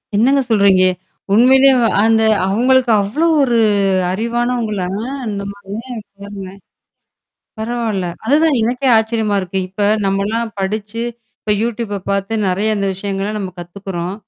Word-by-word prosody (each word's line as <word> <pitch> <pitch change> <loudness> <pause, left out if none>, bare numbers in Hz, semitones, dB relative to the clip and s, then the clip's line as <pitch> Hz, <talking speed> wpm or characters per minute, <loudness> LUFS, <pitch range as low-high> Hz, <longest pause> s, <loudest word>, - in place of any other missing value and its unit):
என்னங்க 270 +6 +3
சொல்றீங்க? 200 -3 +4 0.5
உண்மையிலேயே 265 +4 +6 0.3
அந்த 225 0 +3 0.2
அவங்களுக்கு 245 +5 +2
அவ்ளோ 235 +12 -1 0.2
ஒரு 245 -4 +2 0.6
அறிவானவங்களா? 230 -2 -1 0.2
அ 275 - -4 0.2
இந்த 200 -1 -4
மாாரி 200 -1 -16 0.5
பாருங்களேன். 195 -1 -9 1.0
பரவால்ல. 220 -4 -2 0.2
அதுதான் 300 +2 +3
எனக்கே 250 +4 0
ஆச்சரியமா 220 -2 0
இருக்கு. 185 +1 -4
இப்ப 200 +2 -1 0.2
நம்மலாம் 215 +4 -1
படிச்சு, 210 +3 -3 0.4
இப்ப 210 - -1
YouTube 230 -2 -3
அ - - -14
பாத்து 200 +2 -1
நெறைய 210 +4 0
அந்த 200 - -1
விஷயங்கள்லாம் 200 +2 -3
நம்ம 190 -3 -5
கத்துக்குறோம். 175 0 -6
215 Hz, 120 wpm, -17 LUFS, 195-235 Hz, 1.0 s, உண்மையிலேயே